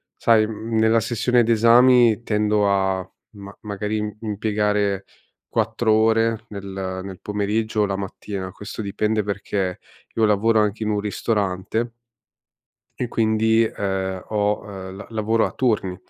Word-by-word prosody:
sai, 110 -2 +3
mhmm, 110 +1 -4
nella 110 +1 +4
sessione 120 +2 +2
d'esami 115 0 +5
tendo 105 -2 +1
a 95 -1 0 0.2
ma 100 -1 -11
magari 105 0 -3
im 105 -1 -3
mpiegare 105 -2 0 0.5
4 115 -2 0
ore 115 0 +2
nel 95 -2 -5
nel 95 -2 -8
pomeriggio 105 +1 -1
o - - +3
la 100 -1 -2
mattina, 95 0 -5
questo 105 +3 -7
dipende, 105 +1 -1
perché 100 -2 -3 0.4
io 110 - +3
lavoro 110 +2 +3
anche 105 +1 0
in 105 - -1
un 105 -1 0
ristorante 105 +2 -2 1.1
e 125 - -1
quindi, 110 0 +2
ehm, 95 -3 -2
ho 105 -1 0
ehm, 95 -1 -8
l 100 - -9
lavoro 110 0 +1
a - - -3
turni. 105 -7 0
105 Hz, 140 wpm, -22 LUFS, 100-110 Hz, 1.1 s, d'esami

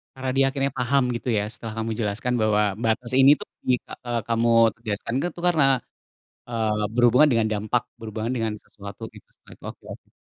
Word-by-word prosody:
Karena 130 0 -3
dia 135 - +5
akhirnya 135 -1 -1
paham 130 +2 +2
gitu 125 - -6
ya, 100 - 0
setelah 110 0 -6
kamu 115 0 -3
jelaskan 110 +4 -1
bahwa 105 -1 +3 0.2
batas 120 +2 0
ini 135 +1 +7
tuh - - -9 0.2
jika 125 - -3
eee, 120 -1 -1
kamu 115 0 +1 0.3
tegaskan 110 0 -4
tuh 175 - 0
itu 175 - -11
karena, 160 -5 +3 0.9
eee, 110 -2 -1
berhubungan 125 +5 +5
dengan 115 -2 +2
dampak, 110 +4 0 0.2
berhubungan 110 +1 -4
dengan 110 -2 -1
sesuatu 100 0 -11
gitu. - - -14
Setelah - - -17
itu - - -15
oke - - -26
oke. - - -16
115 Hz, 190 wpm, -24 LUFS, 110-125 Hz, 0.9 s, ini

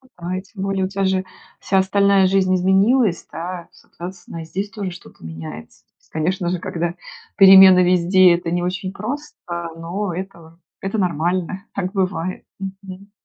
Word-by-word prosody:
Ага, 180 +1 -4
и - - -4
тем 195 0 -9
более 195 -1 0
у - - -2
тя 195 0 -2
же 190 0 +1 0.4
вся 190 0 +1
остальная 200 0 +3
жизнь 185 -1 +2
изменилась, 195 +2 +2
да? 175 +1 -6
Соответственно, 175 -1 -10
и 160 - -8
здесь 195 +5 -4
тоже 200 -2 -5
что-то 175 - -14
меняется. 80 -1 -9
То - - -49
есть. - - -32
Конечно 175 +3 -1
же, 180 -1 -2
когда 170 0 -3 0.4
перемены 190 -2 +9
везде, 180 0 +5
это 170 -1 -4
не 175 - 0
очень 185 +1 -3
просто, 285 +9 -6 0.4
но 175 +3 -4
это 170 -3 -8 0.2
это 195 +3 -3
нормально. 180 +2 -1
Так 190 -1 -3
бывает. 185 -2 -2
Мгм. 195 0 -9
185 Hz, 165 wpm, -20 LUFS, 175-195 Hz, 0.4 s, перемены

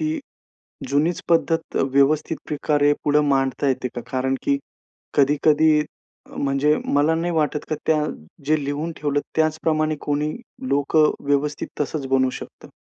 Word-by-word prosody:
ती 315 0 -1 0.7
जुनीच 155 +5 +1
अ, - - -26
पद्धत 165 0 +1 0.2
व्यवस्थित 145 +3 +2
प्रकारे 145 -1 +2
पुढे 150 0 +4
मांडता 135 +1 0
येते 130 -1 -1
का? 120 - -4
कारण, 130 +1 0
की 280 -1 +1 0.6
कधी-कधी, 150 +2 +4
अ, 150 - -12
म्हणजे 140 +2 +2
मला 145 +3 +2
नाही 170 +2 -1
वाटत 150 -1 0
का - - +1
त्या 155 -1 +3 0.4
जे 155 -2 +2
लिहून 145 +4 -3
ठेवलं 145 -1 0 0.2
त्याचप्रमाणे 155 -1 +1
कोणी 150 +1 -1 0.4
लोकं 150 +2 +3 0.2
व्यवस्थित 145 +1 0
तसंच 145 -1 -2
बनू 130 0 +2
शकतं, - - -12
150 Hz, 140 wpm, -22 LUFS, 140-155 Hz, 0.7 s, पुढे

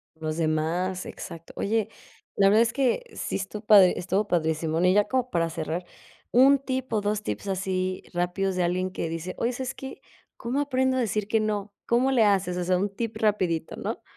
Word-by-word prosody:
Los 155 0 -4
demás, 165 +4 -1
exacto, 165 0 -9
oye, 220 +1 0 0.5
la 195 - +5
verdad 215 +3 +5
es 230 -1 +2
que 270 - +1
sí - - -3
estuvo 205 +2 -6
padri 200 -4 +7
estuvo 195 +3 -1
padrísimo, 160 -2 0
y 180 +1 +4
ya 205 +1 +4
como 255 +2 0
para 165 -1 +1
cerrar, 165 +2 -4 0.5
un 270 +3 +6
tip, 260 -1 -4
o 215 - +2
2 210 +1 -1
tips 205 - -4
así 185 -1 -2
rápidos 180 +2 -1
de 180 - +1
alguien 185 +2 0
que 165 - -3
dice: 165 +2 -4
"Oye, 240 +2 0
¿sabes 260 +1 -4
qué?, 265 0 -9 0.4
¿cómo 255 +5 -1
aprendo 260 -2 +1
a - - +1
decir 215 -3 -1
que 220 +1 +2
no?", 210 -1 -2
¿cómo 250 +3 +3
le 245 -4 +4
haces?, 195 -3 +2
o 180 - -1
sea, 180 +1 +2
un 200 +3 0
tip 225 -1 -3
rapidito, 185 -7 0
¿no? - - -5
195 Hz, 200 wpm, -26 LUFS, 180-230 Hz, 0.5 s, padri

